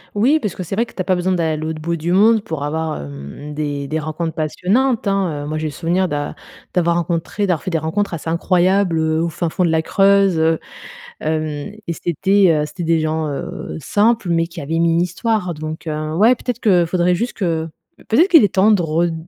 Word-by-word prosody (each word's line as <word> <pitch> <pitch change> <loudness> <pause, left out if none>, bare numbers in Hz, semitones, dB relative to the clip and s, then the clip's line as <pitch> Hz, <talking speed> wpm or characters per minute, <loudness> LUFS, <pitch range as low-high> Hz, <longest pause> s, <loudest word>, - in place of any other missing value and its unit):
Oui, 260 +10 +3
parce 210 - -3
que 185 - -5
c'est 180 - -4
vrai 230 +3 +1
que - - -16
tu - - -4
as - - 0
pas 185 - +2
besoin 180 +1 0
d'aller 165 -3 0
à - - -2
l'autre 155 0 -4
bout 170 +2 -2
du 165 +1 -3
monde 215 +4 +5
pour 160 -6 -4
avoir, 160 +1 -2
hem, 70 - -8
des 145 -2 -3
des 155 +3 -2
rencontres 155 +2 -3
passionnantes, 205 - 0
hein, 185 -7 0
heu - - -6
moi, 155 +1 -3
j'ai 155 - -2
le - - -4
souvenir 175 +5 0
d'a 145 -2 -3 0.4
d'avoir 170 -2 +2
rencontré, 170 +4 -1
d'avoir 180 -6 0
fait - - -3
des 165 - +1
rencontres 160 +6 -2
assez 160 0 -5
incroyables, 180 +1 +2
heu, 160 0 +1
au 170 - 0
fin 165 +1 -2
fond 180 +3 0
de - - +1
la 160 0 +2
Creuse, 195 -1 +3
heu, 160 0 +2 0.6
hem, 155 0 -1 0.4
et 170 - -1
c'était, 190 +4 +2
heu - - -2
c'était 175 - -7
des 165 0 +2
gens, 155 0 -1
heu, 140 - -5
simples, 210 - +1
mais 165 -1 +2
qui 170 0 -9
avaient 160 +3 -2
mis 170 0 +3
une 165 - +2
histoire. 180 0 -1
Donc 155 +1 -6
ouais, 155 +9 +2
peut-être 245 -1 -4
que 180 -5 +4
faudrait 175 +1 +1
juste 235 +7 -2
que 165 -5 -1 0.4
peut-être 315 - +4
qu'il 325 - +7
est 205 - 0
temps 195 +3 +5
de 205 -4 +3
red 165 +1 0
170 Hz, 230 wpm, -19 LUFS, 155-195 Hz, 0.6 s, qu'il